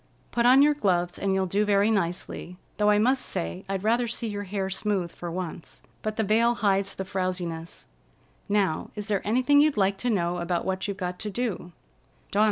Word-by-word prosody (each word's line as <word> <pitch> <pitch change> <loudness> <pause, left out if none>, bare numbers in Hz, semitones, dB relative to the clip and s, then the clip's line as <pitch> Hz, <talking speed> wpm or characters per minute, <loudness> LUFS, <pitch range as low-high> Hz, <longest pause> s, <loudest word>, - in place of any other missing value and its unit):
"Put 240 0 +2
on 265 +3 +7
your 295 +1 +5
gloves, 180 -10 0
and 195 -1 +1
you'll 190 0 +1
do 200 +3 +1
very 205 +1 +3
nicely, 180 -2 -2 0.2
though 210 0 +3
I 210 - +5
must 255 +5 +2
say 85 +1 -4
I'd 195 -1 -2
rather 235 +3 +2
see 235 0 -3
your 205 -1 -4
hair 195 0 -2
smooth 190 -2 -1
for 175 - -7
once. 175 -1 -6 0.2
But 215 0 -3
the 220 - 0
veil 230 +3 +3
hides 195 -2 +1
the 190 - -4
frowsiness. 180 -3 -4 0.6
Now, 200 -6 +1
is 210 0 -5
there 200 -2 +1
anything 255 +7 +4
you'd 300 -4 +2
like 195 -1 +2
to 245 - -1
know 175 -5 0
about 175 0 -1
what 190 +1 -1
you've 200 -1 -4
got 180 -2 -4
to 215 - -4
do?" 205 -5 -3
200 Hz, 195 wpm, -26 LUFS, 180-220 Hz, 0.6 s, on